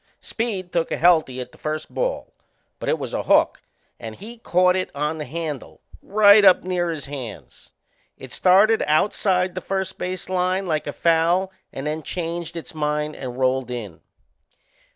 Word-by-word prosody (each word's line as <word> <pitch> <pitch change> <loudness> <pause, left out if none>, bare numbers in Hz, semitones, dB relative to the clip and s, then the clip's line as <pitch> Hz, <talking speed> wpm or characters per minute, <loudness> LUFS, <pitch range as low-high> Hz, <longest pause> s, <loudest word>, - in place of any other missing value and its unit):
Speed 200 -6 -4
took 165 -1 0
a - - -1
healthy 160 -7 +3
at 125 - -6
the - - -19
first 155 0 -4
ball; - - -2 0.5
but - - -3
it 485 - +2
was - - -6
a - - -1
hook - - +3 0.4
and 110 -2 -7
he 230 - -10
caught 180 -3 +3
it 185 - -1
on 150 +2 -2
the 150 - -4
handle, 155 0 -6 0.2
right 205 0 +6
up 190 -2 +6
near 180 -1 -1
his 155 -5 -4
hands. 130 -7 -9 0.5
It 130 -1 -11
started 200 +5 +4
outside 180 +3 +2
the 185 - -5
first 190 0 -3
base 185 0 -4
line 185 +1 0
like 155 -4 -1
a - - -2
foul 170 +4 +2 0.2
and 135 - -6
then 155 +1 -2
changed 170 +1 -4
its 165 - -8
mind 150 0 -2
and 125 -2 -7
rolled 130 -1 +1
in. 110 -9 -6
170 Hz, 170 wpm, -22 LUFS, 150-185 Hz, 0.5 s, right